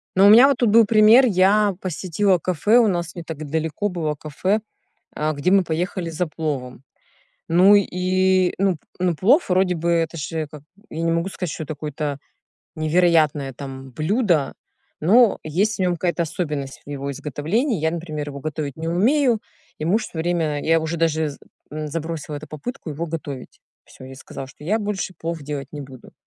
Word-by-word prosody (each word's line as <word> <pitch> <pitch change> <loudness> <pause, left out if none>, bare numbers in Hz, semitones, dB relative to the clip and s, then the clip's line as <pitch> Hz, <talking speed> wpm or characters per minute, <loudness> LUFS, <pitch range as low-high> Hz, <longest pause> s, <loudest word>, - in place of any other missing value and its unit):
Но 190 +1 +6
у - - +8
меня 235 +6 +9
вот 280 -3 +2
тут 240 -3 +2
был 225 +2 +6
пример: 220 +4 +6
я 200 0 +3
посетила 185 +2 0
кафе, 185 +7 +2
у 235 - +4
нас 175 -3 -2
не 170 - -6
так 160 -2 -7
далеко 160 +6 -1
было 160 -5 -2
кафе, 155 +8 -1 0.6
а, 155 +1 -1
где 145 +5 0
мы 195 -1 +5
поехали 175 +1 -3
за 165 +2 -2
пловом. 140 -5 -4 0.7
Ну 180 +5 +6
и, 185 -1 +2
ну, 190 -3 +1 0.2
ну, 180 -1 +1
плов, 235 - +3
вроде 180 0 +2
бы, 170 +1 -1
это 165 -1 0
же 155 +1 -3
как 150 -1 -12 0.3
Я 160 - -4
не 165 0 +1
могу 170 +3 0
сказать, 180 -4 -5
что 160 - -5
это 155 - -5
какое-то 145 -1 -4 0.6
невероятное 155 -3 +2
там 135 0 -9
блюдо, 165 - 0 0.5
но 220 +8 +5
есть 195 +8 0
в - - -8
нём 180 -1 +2
какая-то 170 0 -1
особенность 150 -5 -4
в - - -9
его 140 0 -4
изготовлении. 155 - -1
Я, 160 +1 +1
например, 155 -3 -5
его 140 0 -8
готовить 150 -2 -4
не 165 +1 -4
умею, 235 - +2 0.4
и - - -4
муж 200 +8 +1
всё 160 - -8
время... 160 -3 -1
Я 165 0 +3
уже 160 +1 -3
даже 160 -1 +1
з 140 - -11 0.3
м, 155 0 -5
забросила 160 -1 -5
эту 150 +1 -8
попытку 155 - -7
его 155 +3 -4
готовить. 150 -5 -7 0.2
Всё, - - -14
я 130 0 -10
сказала, 135 0 -9
что 135 +2 -15
я 210 +7 +1
больше 205 -3 -3
плов 165 0 -4
делать 140 -2 -5
не 150 - -6
буду. 130 -3 -13
165 Hz, 185 wpm, -22 LUFS, 150-190 Hz, 0.7 s, меня